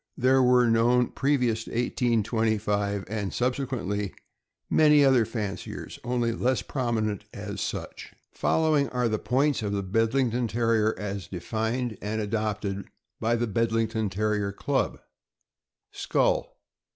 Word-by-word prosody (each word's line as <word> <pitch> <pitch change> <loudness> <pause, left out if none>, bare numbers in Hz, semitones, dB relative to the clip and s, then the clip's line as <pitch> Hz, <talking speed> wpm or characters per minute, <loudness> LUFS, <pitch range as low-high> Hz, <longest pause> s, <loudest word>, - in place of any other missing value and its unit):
There 130 +1 +4
were 125 -1 +5
known 120 +2 +3
previous 125 -5 0
to - - -9
1825, 110 -4 0
and 105 -1 -3
sub 125 +1 +1
sequently, 105 -7 -3 0.5
many 150 -2 +5
other 130 -4 +4
fanciers, 105 -4 -5
only 120 -1 0
less 120 -2 0
prominent 110 -5 -2
as - - -5
such. - - -5 0.2
Following 155 -3 +2
are 125 -1 0
the 110 -1 -1
points 140 +2 +1
of 100 -2 -2
the 100 -1 -1
Bedlington 115 +4 +1
Terrier 115 -1 +1
as 100 -1 -5
defined 110 +5 -3
and 110 +2 -2
adopted 105 -2 -2 0.3
by 115 +1 +1
the 120 +1 0
Bedlington 115 0 0
Terrier 105 +1 0
Club: 100 - -1 0.9
Skull. - - 0
115 Hz, 125 wpm, -27 LUFS, 105-125 Hz, 0.9 s, were